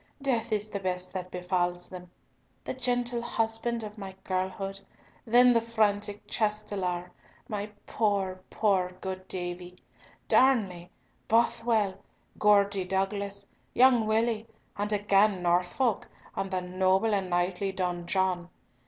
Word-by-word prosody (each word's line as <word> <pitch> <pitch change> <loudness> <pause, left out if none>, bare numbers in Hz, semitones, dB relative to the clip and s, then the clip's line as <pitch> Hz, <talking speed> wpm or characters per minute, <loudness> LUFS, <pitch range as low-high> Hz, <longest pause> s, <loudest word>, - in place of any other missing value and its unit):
Death 235 -4 0
is 210 0 -1
the 200 - -2
best 185 -1 -3
that 185 -1 -4
befalls 180 -1 -1
them! 180 -1 -10 0.5
The - - -4
gentle 245 -1 0
husband 230 0 -1
of 210 0 -8
my 190 -1 -7
girlhood—then 195 +6 +1
the 230 - +3
frantic 210 -2 0
Chastelar, 205 -5 -1 0.4
my 205 -1 -3 0.2
poor, 195 -4 0
poor 190 -4 +1
good 185 -1 -5
Davie, 180 0 -5 0.5
Darnley, 195 -10 +3 0.4
Bothwell, 230 -3 +2 0.4
Geordie 200 -2 +4
Douglas, 200 +1 -2 0.3
young 245 -3 +5
Willie, 220 0 +1 0.3
and 205 +1 -2
again 205 -2 +3
Norfolk, 180 +7 +1 0.3
and 195 - -2
the 185 -1 -1
noble 185 +4 +2
and 195 -2 0
knightly 180 +2 0
Don 180 -2 -2
John! 180 -1 0
200 Hz, 120 wpm, -29 LUFS, 185-220 Hz, 0.5 s, young